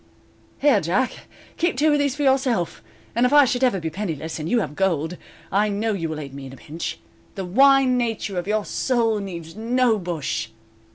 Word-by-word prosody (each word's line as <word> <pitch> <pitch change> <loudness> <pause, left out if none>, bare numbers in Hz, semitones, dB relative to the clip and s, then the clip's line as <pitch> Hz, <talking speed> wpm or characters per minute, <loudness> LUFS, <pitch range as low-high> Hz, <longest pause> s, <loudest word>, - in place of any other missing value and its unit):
"Here, 275 -8 +4
Jack, 190 +11 -1 0.3
keep 340 -5 0
two 300 +2 +3
of 295 - +2
these 285 -2 +1
for 295 - -2
yourself, 260 - +1 0.3
and 235 - +1
if 250 - +3
I 290 -1 +7
should 250 0 0
ever 245 -7 +3
be 160 -1 -4
penniless, 165 -4 -4
and 155 +2 -4
you 240 - +3
have 170 -8 -3
gold, 170 -3 0 0.4
I 210 +2 +2
know 215 +2 -1
you 165 -5 -3
will 155 -1 -4
aid 140 -3 -8
me 135 -1 -8
in 130 - -11
a - - -11
pinch. 165 +2 -6 0.4
The 195 - -4
wine 265 +5 +5
nature 220 -5 -2
of 175 - -6
your 210 -1 0
soul 230 -4 +1
needs 170 -4 -7
no 230 0 +2
bush." 160 - -3
210 Hz, 205 wpm, -23 LUFS, 165-255 Hz, 0.4 s, I